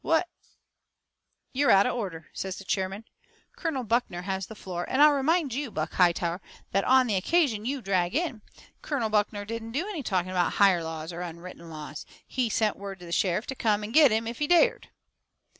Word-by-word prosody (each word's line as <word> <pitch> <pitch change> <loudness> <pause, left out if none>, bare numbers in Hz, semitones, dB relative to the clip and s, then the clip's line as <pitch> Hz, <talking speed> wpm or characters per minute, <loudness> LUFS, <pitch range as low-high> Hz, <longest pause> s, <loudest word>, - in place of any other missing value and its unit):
What 330 +2 +2 0.7
" - - -51
"You're 280 +2 +2
out 195 0 +6
of 250 - 0
order," 180 -10 -5
says 190 -1 -4
the - - -9
chairman, 195 +2 -2 0.5
"Colonel 315 -7 -2
Buckner 225 -6 -1
has 190 -1 -3
the 220 - -10
floor. 180 -3 -5
And 260 - 0
I'll 300 +1 +8
remind 290 0 +1
you, 275 +1 -3
Buck 155 -5 -4
Hightower, 175 0 +2 0.3
that, 195 +1 +2
on 260 0 +5
the 225 - -1
occasion 225 - +1
you 270 -2 -3
drag 185 -1 0
in, 310 -9 -1 0.4
Colonel 245 -7 -2
Buckner 205 -1 0
didn't 225 +1 -6
do 320 +9 -1
any 390 -8 -4
talking 185 -6 -1
about 180 -2 +1
higher 190 -4 +4
laws 160 +1 -5
or 170 - -6
unwritten 170 0 -8
laws. 150 -1 -8 0.2
He 250 -3 -1
sent 215 -1 +1
word 195 -1 -7
to - - -9
the 170 - -9
sheriff 180 +4 +1
to 265 - -5
come 215 -4 +1
and 215 +2 -6
get 305 -2 +7
him 220 +1 0
if 230 +1 -5
he 295 - 0
dared." 355 +9 +3
210 Hz, 205 wpm, -27 LUFS, 180-260 Hz, 0.7 s, I'll